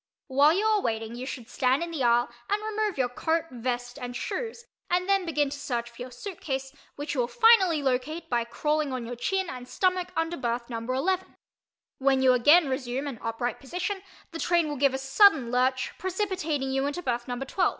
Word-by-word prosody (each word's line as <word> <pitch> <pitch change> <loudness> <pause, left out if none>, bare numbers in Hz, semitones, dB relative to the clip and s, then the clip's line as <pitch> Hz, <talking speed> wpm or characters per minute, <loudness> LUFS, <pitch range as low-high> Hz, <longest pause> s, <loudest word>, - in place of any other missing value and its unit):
While 285 +3 +4
you 400 +5 +1
are 430 -2 +3
waiting 225 -3 -2
you 250 +2 -6
should 245 -4 -6
stand 260 +4 +1
in 340 - -5
the 315 -4 -3
aisle 240 0 +4 0.2
and 415 +1 0
remove 430 -3 -1
your 255 -2 +2
coat, 320 +6 0
vest 245 +1 -3
and 245 0 -5
shoes, 470 - -4 0.2
and 360 +1 +1
then 390 -2 +2
begin 295 -3 +1
to 285 - -6
search 240 -4 -3
for 235 - -12
your 250 - -5
suitcase 270 -2 -5 0.2
which 290 0 -4
you 275 - -2
will 240 - +2
finally 390 - +5
locate 270 +5 -1
by 240 -1 +1
crawling 300 +4 -1
on 250 -2 -3
your 245 +1 -5
chin 380 +10 -1
and 250 -4 -7
stomach 365 +2 +1
under 325 +1 -1
berth 235 0 -3
number 230 +2 -3
11. 370 +7 -1 0.6
When 265 -1 +3
you 255 -1 +6
again 295 +7 +6
resume 260 0 -2
an 270 -6 -5
upright 230 +2 -3
position 360 +7 -3 0.3
the 330 - -6
train 340 -2 +2
will 295 - -3
give 275 -1 +2
a - - 0
sudden 270 - +4
lurch, 255 +1 +1
precipitating 365 -8 -1
you 270 +1 +1
into 350 +5 -4
berth 240 -2 -2
number 250 +2 -3
12. 360 +7 +2
275 Hz, 205 wpm, -27 LUFS, 250-350 Hz, 0.6 s, you